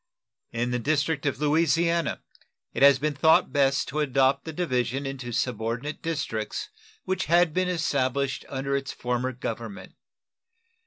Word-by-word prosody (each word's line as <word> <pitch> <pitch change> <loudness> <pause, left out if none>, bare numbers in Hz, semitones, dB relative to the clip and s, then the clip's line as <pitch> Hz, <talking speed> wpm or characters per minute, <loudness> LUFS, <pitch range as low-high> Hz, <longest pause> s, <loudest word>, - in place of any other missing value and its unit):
In 120 +1 -1
the 125 - 0
district 150 +2 0
of 135 -2 -1
Louisiana 165 +2 +1 0.5
it - - -4
has 140 -1 +8
been 150 +2 -1
thought 160 +3 +4
best 140 -1 +2
to 150 - -3
adopt 135 -1 +2
the 160 - -4
division 135 -5 -1
into 135 -3 -5
subordinate 120 +4 -2
districts 140 -10 -3 0.4
which 190 0 -1
had 170 0 +3
been 185 +1 +1
established 140 -5 0
under 135 0 -2
its 135 -1 -2
former 125 +1 -2
government. 115 -4 -6
140 Hz, 140 wpm, -26 LUFS, 125-155 Hz, 0.5 s, has